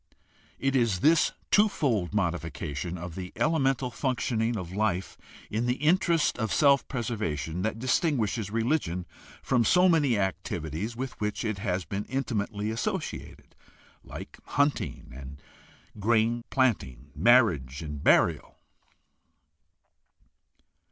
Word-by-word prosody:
It 135 Hz, 0 st, 0 dB
is 115 Hz, -8 st, +2 dB
this 160 Hz, +1 st, +4 dB, 0.2 s
twofold 140 Hz, -, +2 dB
modification 85 Hz, -4 st, -3 dB
of 90 Hz, 0 st, -7 dB
the 90 Hz, +1 st, -6 dB
elemental 135 Hz, -5 st, +1 dB
functioning 115 Hz, -2 st, -1 dB
of 90 Hz, -2 st, -6 dB
life 100 Hz, -3 st, -1 dB, 0.4 s
in 115 Hz, +3 st, -1 dB
the 125 Hz, -, +1 dB
interest 165 Hz, -1 st, +2 dB
of 110 Hz, -3 st, -1 dB
self 140 Hz, -2 st, +4 dB
preservation 105 Hz, -, -3 dB
that 110 Hz, +2 st, -1 dB
distinguishes 120 Hz, -, 0 dB
religion 110 Hz, -, -1 dB, 0.4 s
from 125 Hz, -3 st, +2 dB
so 180 Hz, +10 st, +5 dB
many 145 Hz, -, +3 dB
activities 95 Hz, +1 st, -3 dB
with 130 Hz, 0 st, -6 dB
which 105 Hz, +3 st, -2 dB
it 110 Hz, -3 st, -2 dB
has 90 Hz, -4 st, -2 dB
been 100 Hz, +6 st, -4 dB
inti 135 Hz, -1 st, -3 dB
mately 105 Hz, +1 st, -4 dB
associated, 115 Hz, -, -5 dB, 0.5 s
like -, -, -10 dB
hunting, 145 Hz, +1 st, -1 dB
and 70 Hz, +1 st, -9 dB, 0.6 s
grain 115 Hz, +2 st, +1 dB
planting, 75 Hz, -, 0 dB
marriage, 80 Hz, -, +3 dB
and 75 Hz, -2 st, -6 dB
burial. -, -, +3 dB
110 Hz, 115 wpm, -28 LUFS, 90-130 Hz, 0.6 s, so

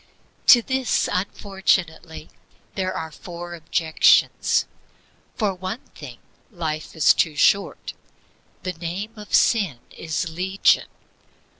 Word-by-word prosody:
To 240 Hz, -3 st, +8 dB
this, 260 Hz, 0 st, 0 dB
unfortunately, 180 Hz, -5 st, -2 dB, 0.4 s
there 185 Hz, -1 st, -2 dB
are 160 Hz, -3 st, -5 dB
four 175 Hz, +2 st, -9 dB
objections: 160 Hz, -1 st, +2 dB, 0.7 s
For 210 Hz, -4 st, 0 dB
one 185 Hz, +6 st, -6 dB
thing, -, -, -10 dB, 0.3 s
life 160 Hz, -7 st, -5 dB
is 160 Hz, -, +5 dB
too 160 Hz, -3 st, 0 dB
short; 200 Hz, +6 st, +1 dB, 0.7 s
the 185 Hz, -, -3 dB
name 175 Hz, +6 st, -5 dB
of 210 Hz, -2 st, -3 dB
sin 200 Hz, -, +2 dB, 0.2 s
is 165 Hz, +2 st, -3 dB
legion. 185 Hz, +4 st, +1 dB
180 Hz, 105 wpm, -22 LUFS, 160-200 Hz, 0.7 s, To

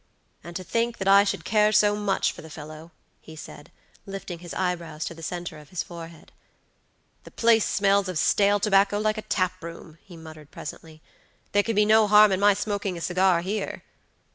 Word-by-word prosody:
"And 170 Hz, +2 st, -10 dB
to 185 Hz, -, -4 dB
think 230 Hz, +5 st, -1 dB
that 195 Hz, -, -4 dB
I 200 Hz, +1 st, +7 dB
should 200 Hz, -, -3 dB
care 210 Hz, -1 st, +3 dB
so 210 Hz, -1 st, +4 dB
much 205 Hz, -2 st, 0 dB
for -, -, -12 dB
the 160 Hz, -, -12 dB
fellow!" 155 Hz, +2 st, -10 dB, 0.3 s
he 160 Hz, -, -13 dB
said, 145 Hz, -1 st, -12 dB, 0.4 s
lifting 195 Hz, -3 st, -7 dB
his 175 Hz, -1 st, -10 dB
eyebrows 170 Hz, -4 st, -3 dB
to -, -, -5 dB
the 165 Hz, -, -13 dB
center 175 Hz, -1 st, -6 dB
of 150 Hz, -, -16 dB
his 185 Hz, -, -3 dB
forehead. 165 Hz, -2 st, -11 dB, 0.9 s
"The -, -, -12 dB
place 230 Hz, -2 st, +3 dB
smells 200 Hz, -1 st, +2 dB
of 180 Hz, -, -3 dB
stale 205 Hz, +5 st, +3 dB
tobacco 200 Hz, 0 st, +3 dB
like 215 Hz, +1 st, 0 dB
a -, -, -12 dB
tap 185 Hz, -2 st, -1 dB
room," 165 Hz, -1 st, -10 dB
he 175 Hz, -4 st, -14 dB
muttered 155 Hz, -2 st, -12 dB
presently; 155 Hz, +1 st, -10 dB, 0.5 s
"there 205 Hz, -, +3 dB
can 225 Hz, +1 st, -3 dB
be 210 Hz, +1 st, +4 dB
no 215 Hz, 0 st, +5 dB
harm 210 Hz, 0 st, +6 dB
in 190 Hz, -, 0 dB
my 205 Hz, 0 st, +4 dB
smoking 205 Hz, -2 st, -3 dB
a -, -, -8 dB
cigar 185 Hz, 0 st, +2 dB
here." 200 Hz, +3 st, -4 dB
190 Hz, 195 wpm, -25 LUFS, 165-205 Hz, 0.9 s, I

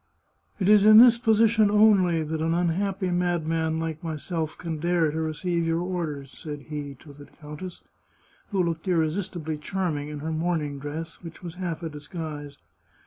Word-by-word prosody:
" -, -, -40 dB
It 190 Hz, -, 0 dB
is 210 Hz, -1 st, +6 dB
in 215 Hz, +1 st, +8 dB
this 235 Hz, 0 st, +8 dB
position 220 Hz, -2 st, +4 dB
only 200 Hz, -6 st, +4 dB
that 155 Hz, +1 st, -3 dB
an 165 Hz, +1 st, +1 dB
unhappy 185 Hz, +2 st, 0 dB
madman 165 Hz, -2 st, 0 dB
like 160 Hz, 0 st, -4 dB
myself 160 Hz, 0 st, -4 dB
can 165 Hz, -3 st, -5 dB
dare 170 Hz, -1 st, +2 dB
to 160 Hz, +1 st, -2 dB
receive 170 Hz, +2 st, -1 dB
your 165 Hz, +1 st, +1 dB
orders," 160 Hz, -7 st, -4 dB
said 150 Hz, -3 st, -7 dB
he 145 Hz, -2 st, -5 dB
to 145 Hz, -, -13 dB
the 145 Hz, 0 st, -13 dB
countess, 150 Hz, +4 st, -10 dB, 0.7 s
who 195 Hz, -3 st, +1 dB
looked 165 Hz, +1 st, -3 dB
irresistibly 160 Hz, -2 st, -1 dB
charming 160 Hz, -4 st, -2 dB
in 150 Hz, -, -6 dB
her 160 Hz, +2 st, -3 dB
morn 165 Hz, +1 st, 0 dB
ing 145 Hz, -2 st, -5 dB
dress, 160 Hz, +3 st, -6 dB
which 165 Hz, 0 st, -11 dB
was 170 Hz, -2 st, -6 dB
half 175 Hz, -2 st, -4 dB
a 165 Hz, -, -3 dB
disguise. 150 Hz, -1 st, -7 dB
165 Hz, 175 wpm, -26 LUFS, 155-180 Hz, 0.7 s, in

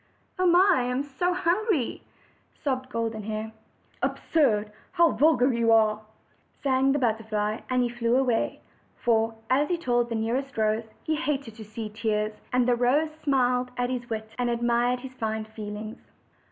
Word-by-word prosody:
"Oh! 365 Hz, -1 st, +4 dB, 0.2 s
I 290 Hz, -, +2 dB
am 250 Hz, +2 st, -1 dB
so 290 Hz, +6 st, -1 dB
hungry!" 365 Hz, -, 0 dB, 0.6 s
sobbed 260 Hz, -2 st, -1 dB
Golden 230 Hz, -2 st, -2 dB
Hair. 215 Hz, +1 st, -4 dB, 0.5 s
"Absurd! 215 Hz, -10 st, +1 dB, 0.2 s
How 340 Hz, -2 st, +5 dB
vulgar 260 Hz, 0 st, +3 dB
you 230 Hz, -1 st, +2 dB
are!" 215 Hz, -1 st, +4 dB, 0.6 s
sang 270 Hz, 0 st, +3 dB
the 285 Hz, -, +2 dB
butterfly, 220 Hz, -3 st, -1 dB
and 255 Hz, -1 st, +2 dB
he 240 Hz, -, 0 dB
flew 235 Hz, 0 st, 0 dB
away; 250 Hz, -4 st, 0 dB, 0.4 s
for, 225 Hz, -1 st, +1 dB, 0.2 s
as 285 Hz, +3 st, +3 dB
he 350 Hz, -, +1 dB
told 240 Hz, -6 st, 0 dB
the 230 Hz, -, -2 dB
nearest 245 Hz, +5 st, -2 dB
rose, 220 Hz, +1 st, 0 dB
he 315 Hz, -, 0 dB
hated 280 Hz, -7 st, -2 dB
to 220 Hz, 0 st, -10 dB
see 215 Hz, +1 st, -6 dB
tears; 215 Hz, 0 st, -1 dB, 0.2 s
and 250 Hz, -1 st, +2 dB
the 250 Hz, -, +4 dB
rose 270 Hz, +6 st, +2 dB
smiled 250 Hz, -3 st, +2 dB
at 245 Hz, 0 st, 0 dB
his 245 Hz, -1 st, -4 dB
wit, 220 Hz, -1 st, -3 dB
and 245 Hz, -1 st, +1 dB
admired 240 Hz, +1 st, +1 dB
his 260 Hz, 0 st, -9 dB
fine 220 Hz, -3 st, -3 dB
feelings. 215 Hz, 0 st, -7 dB
240 Hz, 160 wpm, -26 LUFS, 220-270 Hz, 0.6 s, How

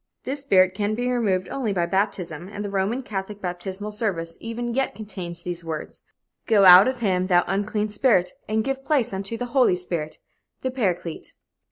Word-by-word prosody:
This 275 Hz, +2 st, -4 dB
spirit 185 Hz, -8 st, +4 dB
can 205 Hz, +2 st, -1 dB
be 245 Hz, +2 st, -1 dB
removed 200 Hz, -7 st, 0 dB
only 250 Hz, -6 st, -2 dB
by 175 Hz, -3 st, +1 dB
baptism, 175 Hz, -3 st, -2 dB
and 205 Hz, 0 st, -5 dB
the 200 Hz, -, -4 dB
Roman 200 Hz, +7 st, -1 dB
Catholic 200 Hz, -1 st, -5 dB
baptismal 190 Hz, +3 st, -5 dB
service 180 Hz, -7 st, -2 dB
even 235 Hz, +1 st, -4 dB
yet 270 Hz, +1 st, -1 dB
contains 180 Hz, -5 st, -5 dB
these 175 Hz, -1 st, -4 dB
words: 160 Hz, -2 st, -6 dB, 0.5 s
"Go 210 Hz, -4 st, +5 dB
out 185 Hz, +3 st, +10 dB
of 260 Hz, -2 st, -2 dB
him, 185 Hz, -4 st, +1 dB
thou 175 Hz, -2 st, +4 dB
unclean 210 Hz, +2 st, -1 dB
spirit, 205 Hz, -5 st, +2 dB, 0.2 s
and 220 Hz, 0 st, +1 dB
give 270 Hz, +2 st, -3 dB
place 275 Hz, -8 st, +1 dB
unto 195 Hz, +4 st, -3 dB
the 245 Hz, -, -3 dB
Holy 255 Hz, -9 st, +4 dB
Spirit, 170 Hz, -4 st, -4 dB, 0.4 s
the 260 Hz, -, -2 dB
Paraclete." 180 Hz, -9 st, -2 dB
200 Hz, 180 wpm, -24 LUFS, 180-230 Hz, 0.5 s, out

